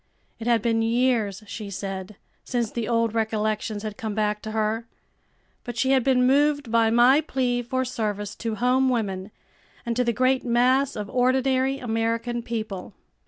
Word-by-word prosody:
It 225 - -5
had 230 -3 +3
been 225 -1 +2
years, 225 -3 +1
she 210 0 -7
said, 195 0 -5 0.3
since 235 -4 -2
the 230 -3 -3
old 230 -2 +1
recollections 215 -1 -1
had 215 -1 -5
come 220 -2 -4
back 210 -1 0
to 220 - -6
her, 220 +1 -1 0.8
but 240 -1 -7
she 260 +3 +2
had 265 -2 +4
been 250 -1 +3
moved 285 -1 +2
by 230 -1 +4
my 245 +6 +5
plea 250 -4 -1
for 260 +2 -2
service 210 -4 -3
to 225 -2 -3
home 255 +3 +2
women 200 -5 -2 0.6
and 235 -1 -1
to 250 - +2
the 235 - +1
great 255 +2 +2
mass 255 +3 +2
of 210 -1 -4
ordinary 260 +1 +2
American 230 0 -1
people. 220 -5 -5
230 Hz, 165 wpm, -25 LUFS, 215-255 Hz, 0.8 s, my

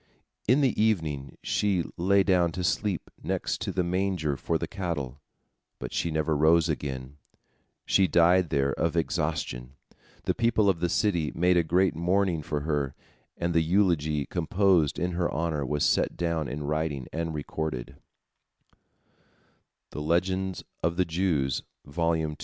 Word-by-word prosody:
In 130 +6 +4
the 130 -6 +2
evening 80 -11 0
she 100 -4 +1
lay 95 +3 +3
down 90 -3 +3
to 90 - -3
sleep 95 0 -1
next - - -2
to - - -2
the 90 - 0
manger 90 -4 0
for 80 +4 -1
the - - -4
cattle, 75 -9 -4 0.6
but - - -7
she 85 - 0
never 80 0 0
rose 80 +2 +4
again, 70 -3 -4 0.7
she 95 - +4
died 90 0 +4
there 70 -1 +1
of 85 0 -1
exhaustion. 75 -7 -2 0.5
The - - +1
people 115 -3 +2
of 90 -4 +1
the 90 +1 0
city 85 -6 +1
made 90 +2 +3
a 85 - +5
great 90 +2 +2
mourning 90 0 +1
for 75 0 -3
her, 70 -3 -1 0.4
and 85 0 -1
the 80 +2 +2
elegy 80 -7 +2
composed 85 -3 +2
in 90 +1 -1
her 85 0 0
honor 80 -3 -1
was 75 +2 0
set - - +1
down 85 -3 -1
in 75 +3 -4
writing 75 -3 -2
and 80 -1 -2
recorded. 70 -3 -4
85 Hz, 135 wpm, -27 LUFS, 75-90 Hz, 0.7 s, a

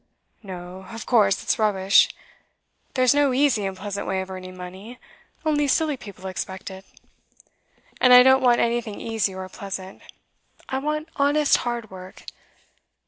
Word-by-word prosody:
'No; 185 -1 -9
of 225 -1 -8
course 205 -6 +3
it's - - 0
rubbish. 195 -2 +4 0.9
There's 255 0 +4
no 285 -2 +2
easy 255 -8 +2
and 190 -1 -6
pleasant 200 +1 -5
way 190 - -1
of 190 0 -8
earning 185 0 -8
money; 190 +7 -9 0.5
only 295 -2 +2
silly 305 +1 +1
people 200 -6 -12
expect 190 +2 -5
it. 190 0 -11 1.2
And 250 - +5
I 250 0 +10
don't 265 +1 +5
want 245 -2 +4
anything 235 -2 -1
easy 220 -4 -2
or 190 0 -6
pleasant. 190 0 -8 0.7
I 265 - -2
want 305 +3 -3
honest 290 +1 +3
hard 240 -3 -4
work. 185 0 -11
215 Hz, 145 wpm, -23 LUFS, 190-255 Hz, 1.2 s, I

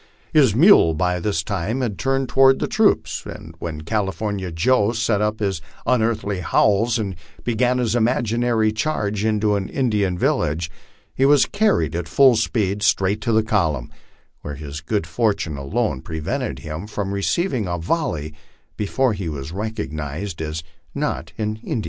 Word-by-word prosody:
His 135 -9 +5
mule 135 - +6
by 90 +2 0
this 85 -3 -1
time 100 +7 -2
had 110 -7 -2
turned 135 0 0
toward 135 +1 +5
the - - -1
troops, - - +1
and - - -9
when 80 -3 -5
California 100 0 -2
Joe 105 +5 +2
set 115 -2 +1
up 105 +1 0
his 95 -5 -1 0.2
un 125 -1 +3
earthly 110 -4 -1
howls, 105 +6 +2
and 100 -4 -3 0.3
began 120 +2 +1
his 120 -3 0
imaginary 120 -1 +1
charge 105 -4 -1
into 105 -1 +1
an 100 -2 -2
Indian 105 -9 0
village, 80 0 0 0.4
he 130 - 0
was 140 0 +6
carried 200 - +1
at 85 -2 -3
full 130 - +6
speed 105 -3 0
straight 100 0 +2
to 115 - 0
the 110 0 +3
column, 85 - 0 0.5
where 75 - -6
his 75 0 -7
good 100 +2 -1
fortune 100 -3 -1
alone 70 - -2
pre 80 - -6
vented 70 -3 -3
him 80 +6 -5
from 100 -2 -3
receiving 120 - 0
a 85 0 -2
volley 80 - -2 0.4
before 115 +4 +1
he 95 -4 -4
was 75 0 -6
recognized 85 -4 -4
as 80 0 -4 0.3
not - - -2
an 110 0 -2
Indian. 110 - -3
105 Hz, 160 wpm, -21 LUFS, 85-115 Hz, 0.5 s, mule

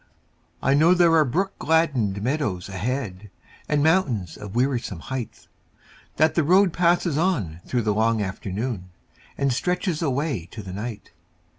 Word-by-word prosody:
I 135 - +3
know 160 +5 +5
there 175 -2 +4
are 160 -1 +6
brook 190 +9 -2
gladdened 130 -12 +1
meadows 125 -9 -1
ahead, 105 0 -4 0.4
And 145 -1 +2
mountains 130 - +1
of 100 0 -9
wearisome 120 -7 0
height; 130 +3 -6 0.7
That 155 +2 +3
the 165 - +2
road 185 +3 +4
passes 170 -3 +2
on 105 - -1
through 120 -2 0
the 105 -1 +1
long 110 +1 +2
afternoon 100 0 -4 0.5
And 140 -2 +1
stretches 180 +3 -1
away 140 - -1
to 105 +1 -8
the 95 - -8
night. 105 +1 -6
130 Hz, 145 wpm, -24 LUFS, 105-160 Hz, 0.7 s, are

